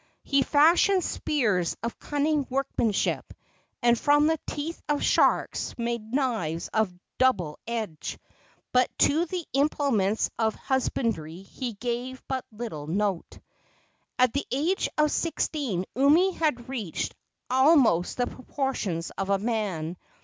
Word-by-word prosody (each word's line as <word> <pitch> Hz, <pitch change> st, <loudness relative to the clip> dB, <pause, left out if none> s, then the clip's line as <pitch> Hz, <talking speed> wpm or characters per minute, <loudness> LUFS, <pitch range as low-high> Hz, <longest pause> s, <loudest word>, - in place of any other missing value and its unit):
He 275 Hz, -1 st, +2 dB
fashioned 340 Hz, +7 st, +4 dB
spears 210 Hz, -, 0 dB
of 235 Hz, -, -4 dB
cunning 295 Hz, -1 st, 0 dB
workmanship, 250 Hz, -5 st, -1 dB, 0.5 s
and 240 Hz, 0 st, +5 dB
from 290 Hz, +1 st, +4 dB
the 320 Hz, 0 st, +2 dB
teeth 310 Hz, +3 st, -4 dB
of 295 Hz, -1 st, +1 dB
sharks -, -, +2 dB
made 235 Hz, -2 st, -3 dB
knives 225 Hz, -, -1 dB
of 220 Hz, -4 st, +1 dB, 0.3 s
double 185 Hz, -13 st, +2 dB
edge, 220 Hz, -9 st, -4 dB, 0.5 s
but 250 Hz, 0 st, +3 dB
to 320 Hz, +4 st, +3 dB
the 355 Hz, -1 st, -4 dB
implements 270 Hz, -8 st, +1 dB
of 220 Hz, -1 st, +1 dB
husbandry 225 Hz, -, -2 dB
he 240 Hz, +4 st, -5 dB
gave 245 Hz, +4 st, -4 dB
but 260 Hz, -1 st, -2 dB
little 210 Hz, -10 st, -6 dB
note. 195 Hz, +1 st, -1 dB, 0.8 s
At 250 Hz, -2 st, +4 dB
the 280 Hz, -, -2 dB
age 320 Hz, +9 st, 0 dB
of 300 Hz, -1 st, +3 dB
sixteen 280 Hz, -, -1 dB
Umi 300 Hz, +9 st, +5 dB
had 300 Hz, -9 st, -1 dB
reached 230 Hz, -11 st, -3 dB, 0.4 s
almost 260 Hz, -, +4 dB
the 245 Hz, -, +2 dB
proportions 250 Hz, -, -3 dB
of 195 Hz, 0 st, -2 dB
a 200 Hz, -, +3 dB
man. 195 Hz, -7 st, -2 dB
250 Hz, 125 wpm, -27 LUFS, 205-285 Hz, 0.8 s, and